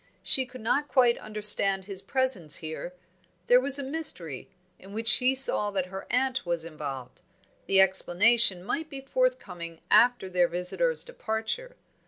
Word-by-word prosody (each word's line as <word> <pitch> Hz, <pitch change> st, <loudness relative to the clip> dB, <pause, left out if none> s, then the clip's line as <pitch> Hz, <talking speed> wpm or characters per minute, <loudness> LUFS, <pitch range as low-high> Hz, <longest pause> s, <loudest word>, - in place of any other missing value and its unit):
She 260 Hz, -1 st, +1 dB
could 255 Hz, -2 st, -12 dB
not 275 Hz, +6 st, -1 dB
quite 245 Hz, -4 st, +2 dB
understand 205 Hz, -2 st, +2 dB
his 195 Hz, -1 st, -5 dB
presence 255 Hz, -, 0 dB
here; 160 Hz, +3 st, -5 dB, 0.5 s
there 245 Hz, +4 st, +4 dB
was 275 Hz, +1 st, +3 dB
a 280 Hz, -, -3 dB
mystery, 265 Hz, -, -2 dB, 0.3 s
in 195 Hz, +2 st, -14 dB
which 225 Hz, +1 st, -5 dB
she 255 Hz, +4 st, +6 dB
saw 260 Hz, -5 st, 0 dB
that 195 Hz, -3 st, -2 dB
her 190 Hz, -, -8 dB
aunt 260 Hz, +1 st, -1 dB
was 170 Hz, -2 st, -3 dB
involved; 140 Hz, -6 st, -8 dB, 0.5 s
the 195 Hz, -, +4 dB
explanation 190 Hz, +1 st, +3 dB
might 310 Hz, +10 st, -4 dB
be 275 Hz, -2 st, -8 dB
forthcoming 270 Hz, -, -3 dB
after 235 Hz, -1 st, +4 dB
their 180 Hz, -1 st, +1 dB
visitor's 180 Hz, -, 0 dB
departure. -, -, -5 dB
215 Hz, 150 wpm, -26 LUFS, 180-265 Hz, 0.5 s, she